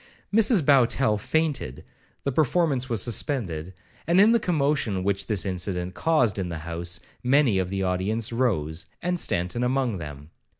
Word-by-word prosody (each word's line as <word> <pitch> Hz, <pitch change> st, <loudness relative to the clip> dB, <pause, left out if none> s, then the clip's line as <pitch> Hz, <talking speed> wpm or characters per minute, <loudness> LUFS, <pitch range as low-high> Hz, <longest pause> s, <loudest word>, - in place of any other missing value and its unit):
Mrs 215 Hz, -, +4 dB
Bowtell 130 Hz, -5 st, +3 dB
fainted, 140 Hz, -, -2 dB, 0.4 s
the 140 Hz, -, -1 dB
performance 140 Hz, -2 st, +1 dB
was 115 Hz, -5 st, +2 dB
suspended, 100 Hz, -, -2 dB, 0.4 s
and, 170 Hz, +3 st, +4 dB
in 210 Hz, +3 st, +7 dB
the 235 Hz, -, +4 dB
commotion 140 Hz, -, 0 dB
which 100 Hz, 0 st, -1 dB
this 105 Hz, -4 st, +1 dB
incident 90 Hz, -1 st, -2 dB
caused 125 Hz, -, +1 dB
in 90 Hz, -2 st, -3 dB
the 85 Hz, -, -4 dB
house, 85 Hz, +1 st, -3 dB, 0.2 s
many 125 Hz, -5 st, +3 dB
of 90 Hz, -1 st, -2 dB
the 95 Hz, 0 st, -2 dB
audience 100 Hz, +5 st, -1 dB
rose, 90 Hz, -10 st, -1 dB, 0.2 s
and 180 Hz, +1 st, -1 dB
Stanton 90 Hz, -, 0 dB
among 125 Hz, -5 st, 0 dB
them. 75 Hz, -1 st, -9 dB
110 Hz, 155 wpm, -25 LUFS, 90-140 Hz, 0.4 s, in